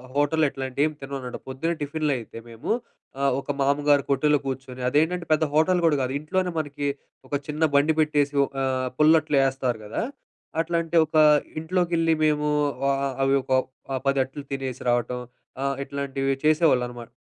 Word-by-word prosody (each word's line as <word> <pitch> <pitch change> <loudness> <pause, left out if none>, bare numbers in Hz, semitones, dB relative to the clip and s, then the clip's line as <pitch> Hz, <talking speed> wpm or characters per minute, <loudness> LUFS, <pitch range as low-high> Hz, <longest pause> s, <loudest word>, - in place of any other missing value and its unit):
Hotel 145 +2 +2
ఇట్లాంటివి 135 +1 -1
ఏం - - -4
తినమనమాట. 135 -2 -5
పొద్దున్నే 165 +6 -2
టిఫిన్‌లు 150 0 -1
అయితే 115 -1 -9
మేము 115 0 -8 0.5
ఆహ్, 140 -1 +3
ఒక 145 - -3
మామ్మగారి 145 +1 +3
కొట్టులో 150 +1 +3
కూర్చొని, 130 -1 -5
అదేంటంటే 165 +5 +1
పెద్ద 155 - +2
హోటల్ 175 +3 +3
కూడా 155 - +3
గాదు. 130 0 -1
ఇంట్లోనే 180 +4 -1
మనకి 145 -1 -3 0.4
ఒక - - -2
చిన్న 150 +1 -5
బండి 150 +3 +4
పెట్టేసి 145 -2 +2
ఒక 140 - -15
ఆహ్, 130 -1 0
పుల్లట్లు 155 -1 +4
యేస్తారు 130 -3 -1
గదా! 105 - -3 0.6
అట్లాంటి 165 0 -2
ఒక 155 +1 -2 0.4
ఇంట్లోకి 175 +2 -1
యెళ్లి 165 0 +3
మేము 150 -1 +1 0.4
ఆ - - +4 0.2
ఆ - - -2
అవొక 135 -1 +1 0.4
ఆహ్, 130 - -2
పదట్లు 135 +1 0
తినేసి 135 -2 -4
రావటం, 120 +1 0 0.4
ఆహ్, 140 0 0
ఇట్లాంటివి 135 -1 -2
చేసేవాళ్ళనమాట. 125 -7 +2
145 Hz, 155 wpm, -25 LUFS, 135-155 Hz, 0.6 s, బండి